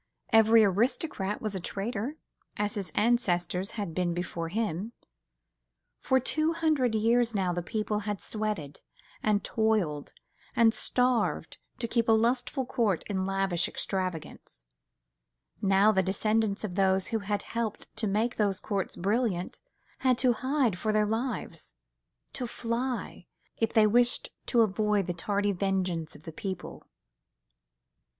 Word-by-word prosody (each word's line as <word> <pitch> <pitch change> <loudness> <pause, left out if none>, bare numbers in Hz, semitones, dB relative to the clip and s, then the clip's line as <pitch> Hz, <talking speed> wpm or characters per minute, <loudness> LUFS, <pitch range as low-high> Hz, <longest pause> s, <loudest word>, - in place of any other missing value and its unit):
Every 225 0 +7
aristocrat 210 - 0
was 215 -2 -2
a 190 - -2
traitor, 215 - -3 0.4
as 205 0 0
his 200 -3 -3
ancestors 195 -5 +1
had 200 -6 -3
been 175 0 0
before 170 -2 -3
him: 215 +1 -2 1.1
for 260 - +2
two 310 +5 +1
hundred 305 -8 +1
years 230 +1 +2
now 185 -3 +1
the 175 - -2
people 210 +4 -2
had 205 -1 -3
sweated, 210 -10 -4 0.4
and 210 -2 +1
toiled, 210 -10 0 0.4
and 225 -1 +5
starved, 250 0 0 0.2
to 230 - -2
keep 230 0 +1
a - - +7
lustful 245 +4 +1
court 225 - 0
in 190 -1 -1
lavish 195 -3 0
extravagance; 185 - -4 1.0
now 195 +1 +5
the 190 - +3
descendants 210 +2 0
of 205 -4 -3
those 190 0 +2
who 225 - 0
had 205 0 -2
helped 230 -2 -3
to 220 - 0
make 220 +5 0
those 200 -3 +1
courts 200 -3 -2
brilliant 200 -1 -1 0.4
had 255 -2 +3
to 250 -1 +3
hide 255 -5 0
for 215 - 0
their 215 0 +3
lives—to 170 - -5
fly, 235 -4 -3 0.3
if 225 -1 0
they 220 -1 +5
wished 240 +3 +3 0.2
to 235 - +4
avoid 210 -1 +2
the 175 - -2
tardy 205 +4 0
vengeance 185 -4 -1
of 150 - -14
the 165 - -8
people. 190 +3 -6
210 Hz, 135 wpm, -29 LUFS, 190-230 Hz, 1.1 s, Every